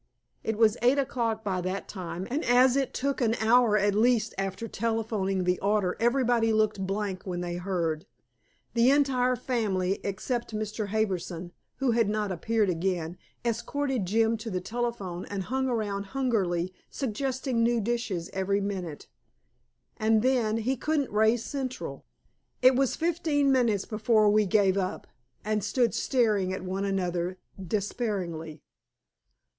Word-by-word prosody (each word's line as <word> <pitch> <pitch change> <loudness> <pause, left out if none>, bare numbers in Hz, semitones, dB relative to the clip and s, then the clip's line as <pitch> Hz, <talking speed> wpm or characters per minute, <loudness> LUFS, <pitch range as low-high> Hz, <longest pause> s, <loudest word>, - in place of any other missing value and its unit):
It 220 -1 -2
was 220 -2 +4
eight 250 +4 +4
o'clock 235 -5 -1
by 190 -3 -1
that 185 +2 -3
time, 180 -1 -5
and 295 +5 -1
as 250 +1 +5
it 275 -1 0
took 275 +1 -2
an 230 -2 +2
hour 225 -1 +4
at 205 0 +2
least 225 +1 +2
after 195 +3 -3
telephoning 215 -4 -1
the 180 0 +1
order, 200 -2 +1
everybody 240 -1 +2
looked 215 -3 +1
blank 195 -1 -2
when 175 -1 -3
they 175 0 -3
heard. 175 -2 -2 0.7
The 235 +1 +4
entire 265 -3 +3
family, 205 -7 -1
except 230 +4 -3
Mr. 215 0 -3
Harbison, 185 -5 -2 0.2
who 270 -2 +1
had 230 -3 +2
not 210 -1 -1
appeared 215 +4 +1
again, 175 -1 -1 0.3
escorted 240 -1 -1
Jim 225 +3 +2
to 225 +1 -6
the 185 -3 -1
telephone 200 -3 -3
and 200 -2 -4
hung 265 +4 -1
around 205 -4 -2
hungrily, 185 -9 0 0.2
suggesting 260 0 -2
new 235 0 +3
dishes 220 -6 -2
every 195 +1 0
minute. 185 -6 -4 0.9
And 220 -1 +3
then 240 -4 +2
he 245 +4 0
couldn't 300 0 0
raise 220 +2 +3
Central. 265 -3 -5 0.6
It 255 0 +7
was 270 0 +2
fifteen 315 -4 +1
minutes 235 -7 +2
before 215 -1 +3
we 210 -1 +3
gave 195 0 +3
up, 185 -1 -3 0.4
and 215 -1 0
stood 235 +2 +1
staring 215 -8 +1
at 190 - -4
one 190 +2 -2
another 180 -2 -1 0.3
despairingly. 180 - -3
215 Hz, 145 wpm, -28 LUFS, 190-240 Hz, 0.9 s, It